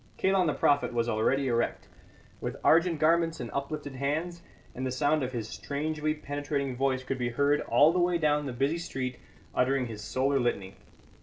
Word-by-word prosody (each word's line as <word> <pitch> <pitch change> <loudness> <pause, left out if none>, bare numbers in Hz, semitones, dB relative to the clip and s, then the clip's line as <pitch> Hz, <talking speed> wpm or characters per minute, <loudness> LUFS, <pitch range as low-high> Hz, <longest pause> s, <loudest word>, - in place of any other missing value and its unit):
Kalon 190 -2 +2
the 150 - 0
Prophet 145 -3 +2
was 115 0 +1
already 125 +5 +1
erect, 120 -1 -1 0.5
with - - -4
argent 165 0 +4
garments 165 +1 +2
and 120 - -5
uplifted 145 0 -4
hands, 155 +6 -2 0.3
and 130 - -5
the 130 - -1
sound 145 +4 +1
of 130 -1 -2
his 115 -4 -4
strangely 155 +4 -2
penetrating 145 -2 -3
voice 130 0 0
could 130 0 -3
be 120 -1 0
heard 140 +4 +2
all 155 +3 +4
the 180 - +1
way 175 0 +2
down 150 -2 +1
the - - -3
busy 135 +7 0
street 130 -6 -4 0.3
uttering 130 0 +1
his 110 -3 -7
solar 135 +6 0
litany. 100 -6 -1
140 Hz, 180 wpm, -29 LUFS, 125-155 Hz, 0.5 s, argent